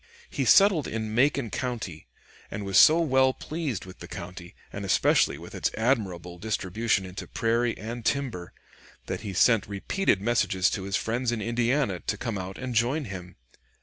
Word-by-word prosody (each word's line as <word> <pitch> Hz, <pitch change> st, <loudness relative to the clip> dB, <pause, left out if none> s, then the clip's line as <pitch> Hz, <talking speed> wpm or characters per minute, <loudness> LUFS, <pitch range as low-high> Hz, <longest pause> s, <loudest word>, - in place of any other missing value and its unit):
He -, -, -1 dB
settled 195 Hz, -8 st, +5 dB
in 110 Hz, -1 st, -4 dB
Macon 130 Hz, 0 st, +2 dB
County, 110 Hz, -, -4 dB, 0.4 s
and 100 Hz, 0 st, -5 dB
was 95 Hz, -1 st, +4 dB
so 160 Hz, +2 st, +7 dB
well 130 Hz, -4 st, +3 dB
pleased 150 Hz, -, -4 dB
with 95 Hz, -1 st, -12 dB
the -, -, -9 dB
country, 90 Hz, 0 st, -9 dB, 0.2 s
and -, -, -5 dB
especially -, -, +3 dB
with -, -, -11 dB
its -, -, 0 dB
admirable 95 Hz, -8 st, -1 dB
distribution 105 Hz, 0 st, -1 dB
into 90 Hz, +1 st, -8 dB
prairie 115 Hz, +1 st, 0 dB
and 115 Hz, +2 st, -6 dB
timber, 120 Hz, -11 st, -2 dB, 0.5 s
that -, -, -4 dB
he 105 Hz, -2 st, -5 dB
sent 110 Hz, +3 st, +4 dB
repeated 100 Hz, -, 0 dB
messages 100 Hz, -4 st, +1 dB
to 95 Hz, -, -3 dB
his 100 Hz, 0 st, -2 dB
friends 120 Hz, +2 st, -1 dB
in 120 Hz, -, -2 dB
Indiana 120 Hz, -2 st, 0 dB
to -, -, -3 dB
come 115 Hz, -5 st, -3 dB
out 95 Hz, +1 st, -6 dB
and 130 Hz, -1 st, -5 dB
join 125 Hz, +6 st, +1 dB
him. 95 Hz, -4 st, -8 dB
115 Hz, 170 wpm, -27 LUFS, 95-125 Hz, 0.5 s, so